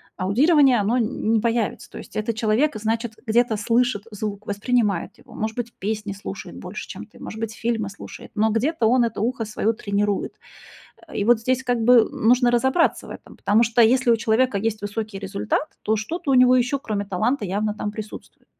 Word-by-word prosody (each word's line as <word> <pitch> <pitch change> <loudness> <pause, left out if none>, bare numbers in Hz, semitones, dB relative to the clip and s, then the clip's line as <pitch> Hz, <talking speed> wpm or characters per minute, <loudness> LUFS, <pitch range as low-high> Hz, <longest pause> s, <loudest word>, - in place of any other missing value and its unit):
аудирование, 265 - +4
оно 210 +5 +1
н 225 -1 0
не 225 - +4
появится. 230 -1 -1
То - - -11
есть - - -11
этот 215 +1 -2
человек, 220 +6 +1
значит, 225 +1 -2
где-то 230 0 +2
слышит 230 0 +1
звук, 210 0 -5
воспринимает 205 -2 -1
его, - - -17
может 220 +1 -4
быть, 240 -1 -4
песни 210 0 -3
слушает 200 - -8
больше, - - -7
чем - - -8
ты, - - -19
может 220 - -8
быть 225 -1 -3
фильмы 225 -4 -2
слушает, 200 - -11
но 220 +1 +2
где-то 240 +4 0
он 250 +1 +4
это 225 -3 -4
ухо 230 0 -1
свое 215 +1 -1
тренирует. 205 -1 -1 0.7
Э, - - -12
и - - 0
вот 235 +1 +4
здесь, 255 +3 0
как 245 -1 0
бы, 240 -1 +6
нужно 245 +2 +3
разобраться 265 +7 +2
в - - -9
этом, - - -12
потому 215 +3 +3
что 235 +1 +3
если 250 +2 +4
у - - +1
человека 225 +1 +1
есть 215 0 -2
высокий 205 0 -4
результат, 200 +9 -3
то 220 - +1
что-то 285 +8 -3
у - - +4
него 255 0 +6
еще, 255 +3 +1
кроме 210 -5 -3
таланта 215 +5 -1
явно 205 +3 -1
там 205 0 -4
присутствует. 215 0 -10
225 Hz, 195 wpm, -23 LUFS, 210-245 Hz, 0.7 s, бы